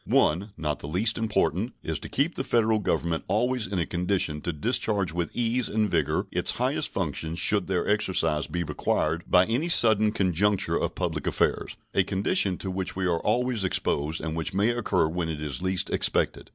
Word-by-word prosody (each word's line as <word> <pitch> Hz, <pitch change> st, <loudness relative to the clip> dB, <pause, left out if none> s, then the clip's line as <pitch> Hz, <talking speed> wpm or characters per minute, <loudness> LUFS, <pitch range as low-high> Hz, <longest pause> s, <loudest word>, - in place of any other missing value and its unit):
One, 90 Hz, +7 st, +2 dB
not 75 Hz, -2 st, -2 dB
the -, -, -7 dB
least 105 Hz, +9 st, +1 dB
important, 110 Hz, 0 st, 0 dB
is -, -, -2 dB
to -, -, -8 dB
keep 150 Hz, +5 st, +1 dB
the -, -, -3 dB
Federal 110 Hz, -3 st, +2 dB
Government 85 Hz, -5 st, -1 dB
always 120 Hz, +3 st, 0 dB
in 95 Hz, 0 st, -3 dB
a 85 Hz, -, 0 dB
condition 90 Hz, -4 st, -1 dB
to 85 Hz, -, -2 dB
discharge 100 Hz, -, 0 dB
with 85 Hz, -1 st, -2 dB
ease 120 Hz, +1 st, 0 dB
and 110 Hz, 0 st, +1 dB
vigor -, -, 0 dB
its -, -, -1 dB
highest -, -, 0 dB
functions 80 Hz, +1 st, -2 dB
should 100 Hz, +2 st, +1 dB
their 90 Hz, -2 st, -1 dB
exercise 90 Hz, -7 st, +1 dB
be 85 Hz, 0 st, -2 dB
required 80 Hz, 0 st, -1 dB
by 90 Hz, +1 st, +5 dB
any 125 Hz, -, -1 dB
sudden 110 Hz, -8 st, +5 dB
conjuncture 100 Hz, 0 st, +1 dB
of -, -, -2 dB
public -, -, -3 dB
affairs -, -, 0 dB, 0.2 s
a 95 Hz, -, +3 dB
condition 100 Hz, -, 0 dB
to 95 Hz, -, -4 dB
which 95 Hz, 0 st, -3 dB
we 95 Hz, 0 st, -2 dB
are 85 Hz, -2 st, +1 dB
always 125 Hz, -3 st, 0 dB
exposed 80 Hz, -4 st, 0 dB
and 80 Hz, -1 st, -4 dB
which 85 Hz, +4 st, -3 dB
may 100 Hz, +4 st, +3 dB
occur 120 Hz, -8 st, +1 dB
when 85 Hz, +1 st, -3 dB
it 80 Hz, -2 st, -4 dB
is 75 Hz, -4 st, -3 dB
least 95 Hz, 0 st, 0 dB
expected. -, -, 0 dB
95 Hz, 190 wpm, -26 LUFS, 85-110 Hz, 0.2 s, by